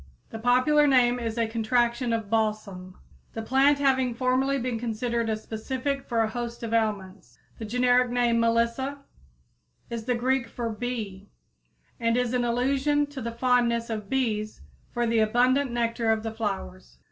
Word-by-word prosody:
The 225 - -6
popular 255 +6 +4
name 250 -2 +4
is 230 -1 -4
a 230 - +2
contraction 235 +2 0
of 225 -2 -1
balsam, 210 -4 -2 0.4
the 225 - -5
plant 270 +5 +3
having 260 -3 +1
formerly 260 +2 +1
been 245 -2 -2
considered 235 0 -2
a 220 - 0
specific 260 +6 -4
for 230 -2 +1
a 220 - +2
host 235 +1 -5
of 230 0 -4
ailments. 195 - -2 0.2
The 225 - -5
generic 250 +2 +2
name, 240 -1 +2
Melissa, 230 +4 +1 0.9
is 230 -1 -4
the 250 0 +1
Greek 255 0 0
for 230 0 -4
bee 215 -4 -5 0.7
and 230 0 +1
is 250 -1 0
an 250 -1 +1
allusion 270 +5 +1
to 275 -2 -7
the 235 - -3
fondness 235 -1 +1
of 210 -2 -5
bees 215 -5 -1 0.3
for 240 0 -1
the 230 -1 +2
abundant 250 +5 +2
nectar 230 -1 -1
of 220 -1 +1
the 225 - -3
flowers. 195 -4 -5
235 Hz, 160 wpm, -26 LUFS, 225-250 Hz, 0.9 s, popular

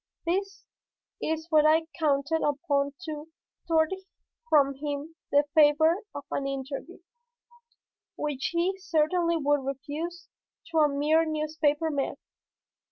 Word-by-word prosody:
This 390 +4 -2 0.6
is 320 0 -2
what 305 -1 +6
I 320 +1 +4
counted 300 +1 +1
upon 285 -1 0
to 310 -3 -6 0.3
extort 320 0 +2 0.6
from 280 -2 +5
him 290 +3 -5
the 285 +1 +4
favor 315 +2 +5 0.2
of 285 - -6
an 275 - -1
interview 275 +6 -5 1.1
which 290 -3 -2
he 345 +3 +1
certainly 335 0 +1
would 290 -2 +1
refuse 305 +6 -5 0.4
to 325 - +2
a 300 -1 +5
mere 300 +3 +3
newspaper 310 0 0
man. 280 -2 -1
305 Hz, 115 wpm, -28 LUFS, 285-325 Hz, 1.1 s, what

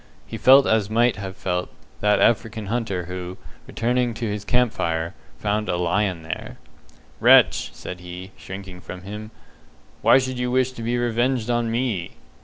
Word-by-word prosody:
He - - -7
felt 135 +1 +7
as 110 -2 +2
might 120 +2 +2
have 95 -1 -6
felt 90 -1 -2 0.3
that 105 0 +3
African 115 -1 +2
hunter 100 -5 -2
who, 90 +1 -6 0.3
returning 120 0 0
to 115 - -3
his 105 0 -3
camp 125 +1 +2
fire, 80 0 -2 0.2
found 105 +1 -1
a 90 - +1
lion 90 0 0
there. 80 - -6 0.6
"Wretch!" - - +5
said 90 - -8
he, 90 +2 -9
shrinking 95 -1 -9
from 90 0 -9
him, 105 +2 -7 0.7
"why - - +6
should 130 -1 -1
you 125 0 0
wish 130 0 +2
to 125 - -9
be 120 +2 0
revenged 120 0 0
on 120 -1 +1
me?" 115 -7 -1
105 Hz, 165 wpm, -23 LUFS, 90-120 Hz, 0.7 s, felt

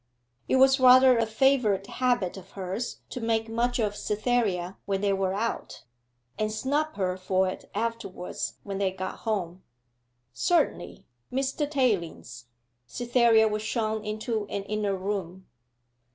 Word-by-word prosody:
It - - +2
was 265 +1 +5
rather 255 0 +7
a 230 -1 +1
favourite 220 -4 +2
habit 240 -6 0
of 190 -1 -11
hers 195 +5 -4
to 250 - -5
make 225 0 0
much 235 +2 0
of 210 -3 0
Cytherea 210 -5 -1
when 195 -1 -1
they 200 -1 +2
were 190 0 0
out, 230 -6 -3 0.6
and 215 0 0
snub 290 +8 -1
her 185 -2 -1
for 185 0 +1
it 185 - -6
afterwards 230 -6 -3
when 200 -1 -5
they 195 -1 +2
got 185 0 -5
home. 185 -4 -2 0.7
'Certainly 315 - 0 0.3
Mr. 275 +3 -1
Tayling's.' 175 - -1 0.4
Cytherea 235 - +3
was 215 0 -2
shown 215 -1 -1
into 215 0 -3
an 200 - -4
inner 210 -1 -1
room. 190 -1 -4
215 Hz, 135 wpm, -27 LUFS, 190-245 Hz, 0.7 s, rather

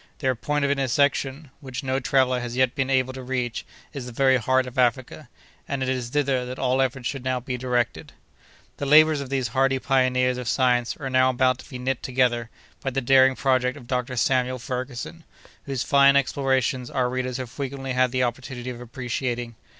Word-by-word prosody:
Their 130 -3 0
point 145 +4 -1
of 140 - +1
intersection, 140 +1 0
which 130 -2 -6
no 130 0 0
traveller 130 0 +2
has 120 -1 -5
yet 130 -1 +3
been 135 -1 -1
able 130 -1 +1
to 130 - -7
reach, 125 -2 -3 0.3
is 135 -4 -6
the - - -7
very 130 +2 +3
heart 130 +2 +1
of 125 0 -6
Africa, 125 +2 0 0.4
and 135 -1 -2
it 130 - -1
is 125 -2 -2
thither 135 -2 0
that 125 +1 -6
all 130 0 +1
efforts 130 -1 -1
should 135 -3 -4
now 130 -1 -1
be 125 +1 -4
directed. 125 -1 -2 0.7
"The 140 - -3
labors 155 0 +6
of 135 - -7
these 130 -4 -1
hardy 135 +2 +2
pioneers 125 -1 +1
of 125 - -6
science 125 -1 +1
are 135 -2 -5
now 130 0 +4
about 130 0 +2
to - - -13
be 130 - -7
knit 130 0 -2
together 125 -2 0 0.3
by 135 - 0
the 135 +1 -1
daring 130 +1 +5
project 130 0 +1
of 130 - -12
Dr. 125 +1 -2
Samuel 130 +1 +1
Ferguson, 130 +5 -6 0.4
whose 135 -3 -2
fine 140 -1 +5
explorations 130 -2 +1
our 125 -1 0
readers 125 0 -2
have 130 -3 -6
frequently 135 -1 -4
had 130 0 +3
the 130 0 +1
opportunity 125 0 -4
of 120 -1 -9
appreciating. 120 0 -4
130 Hz, 195 wpm, -24 LUFS, 125-135 Hz, 0.7 s, labors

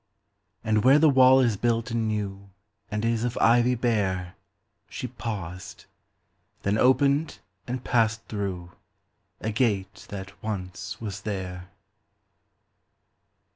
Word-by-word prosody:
And 110 -1 +1
where 135 +3 +7
the 150 0 +5
wall 130 0 +6
is 115 -5 +2
built 115 +2 0
in 115 -1 0
newAnd 100 +1 -6
is 115 0 0
of 120 -1 -2
ivy 120 +2 +4
bareShe 105 +2 -4
paused—then 95 0 -7
opened 140 +6 +3 0.3
and 125 0 -4
passed 115 -1 +1
throughA 95 -4 -4 0.8
gate 100 -5 -1
that 95 -1 -8
once 95 -4 -5
was 105 -3 -6
there. 90 -4 -5
110 Hz, 95 wpm, -26 LUFS, 95-120 Hz, 0.8 s, where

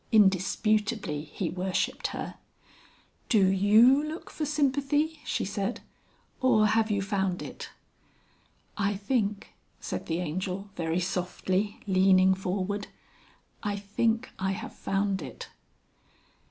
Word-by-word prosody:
(Indisputably 205 -4 +2
he 165 +3 -4
worshipped 185 +1 -1
her.) - - -5 1.0
"Do 210 -5 +5
you 210 +8 +6
look 310 +2 -6
for 305 - -3
sympathy?" 295 +2 +1
she - - -1
said. 200 +3 -3 0.6
"Or 240 -5 +4
have 220 +1 +2
you 205 -2 0
found 195 -2 -1
it?" - - -8 1.1
"I 200 0 +1
think," 205 -1 -1 0.3
said - - -5
the 165 - -1
Angel, 185 +4 -3
very 165 +1 -1
softly, 185 +2 -1
leaning 190 -1 +5
forward, 195 +2 -2 0.7
"I 205 -1 -1
think 225 +4 -1
I 190 0 0
have 220 +3 -6
found 195 -1 -1
it." 135 -4 -8
200 Hz, 115 wpm, -28 LUFS, 185-220 Hz, 1.1 s, you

